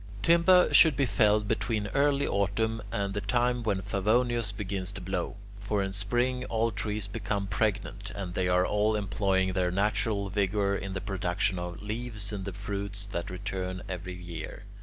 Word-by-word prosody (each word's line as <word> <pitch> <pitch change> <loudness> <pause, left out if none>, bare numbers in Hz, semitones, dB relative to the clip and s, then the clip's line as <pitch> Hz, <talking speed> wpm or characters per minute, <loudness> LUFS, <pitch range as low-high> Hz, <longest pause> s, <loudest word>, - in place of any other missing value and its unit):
Timber 170 +4 +5
should 160 -4 +7
be 140 0 +2
felled 105 -1 +3
between 110 -1 0
early 140 0 +2
Autumn 110 +3 0
and 100 -3 -1
the 105 - -2
time 120 +4 +1
when 100 -4 -1
Favonius 110 +3 +1
begins 95 -2 -3
to 100 - -6
blow. 90 0 -3 0.2
For 100 0 0
in 95 0 -3
Spring 125 +5 0
all 115 -1 0
trees 105 0 -2
become 100 -1 -2
pregnant, 100 0 -1
and 95 -3 -5
they 90 0 0
are 90 0 +3
all 105 +2 +2
employing 95 -2 +1
their 90 -1 +1
natural 100 +1 0
vigour 100 0 +1
in 95 -1 -4
the 95 - -3
production 95 -1 -1
of 90 +2 -6
leaves 105 -1 -4
and 100 -1 -4
of - - -2
the - - -11
fruits 100 0 -3
that 85 -4 -4
return 95 -1 -4
every 90 0 -5
year. 85 -3 -7
100 Hz, 175 wpm, -29 LUFS, 95-110 Hz, 0.2 s, should